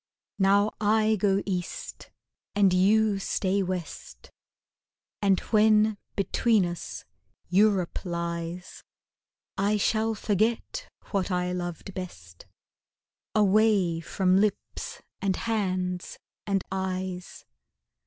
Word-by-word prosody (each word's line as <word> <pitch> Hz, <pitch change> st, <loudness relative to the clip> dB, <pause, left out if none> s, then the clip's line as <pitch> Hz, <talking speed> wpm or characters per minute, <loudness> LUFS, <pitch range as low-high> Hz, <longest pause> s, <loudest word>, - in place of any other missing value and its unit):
Now 200 Hz, +2 st, +4 dB
I 220 Hz, +1 st, +3 dB
go 200 Hz, -1 st, +1 dB
East 180 Hz, -3 st, -5 dB, 0.5 s
and 200 Hz, -2 st, +4 dB
you 205 Hz, +2 st, +3 dB
stay 195 Hz, 0 st, 0 dB
West 180 Hz, -3 st, -6 dB, 0.9 s
And 195 Hz, -2 st, +3 dB
when 215 Hz, -1 st, +4 dB, 0.2 s
between 210 Hz, 0 st, +2 dB
us 175 Hz, -1 st, -6 dB, 0.4 s
Europe 195 Hz, -1 st, +2 dB
lies 170 Hz, 0 st, -4 dB, 0.8 s
I 205 Hz, +2 st, +2 dB
shall 220 Hz, +2 st, +1 dB
forget 225 Hz, -, -1 dB, 0.2 s
what 195 Hz, -2 st, 0 dB
I 180 Hz, -1 st, 0 dB
loved 175 Hz, +1 st, -5 dB
best 85 Hz, -, -9 dB, 0.9 s
Away 205 Hz, -4 st, +3 dB
from 185 Hz, +2 st, +1 dB
lips 215 Hz, -, -2 dB, 0.2 s
and 195 Hz, -1 st, +1 dB
hands 185 Hz, -5 st, -2 dB, 0.3 s
and 195 Hz, -2 st, +1 dB
eyes. 185 Hz, -1 st, -4 dB
195 Hz, 95 wpm, -27 LUFS, 180-215 Hz, 0.9 s, Now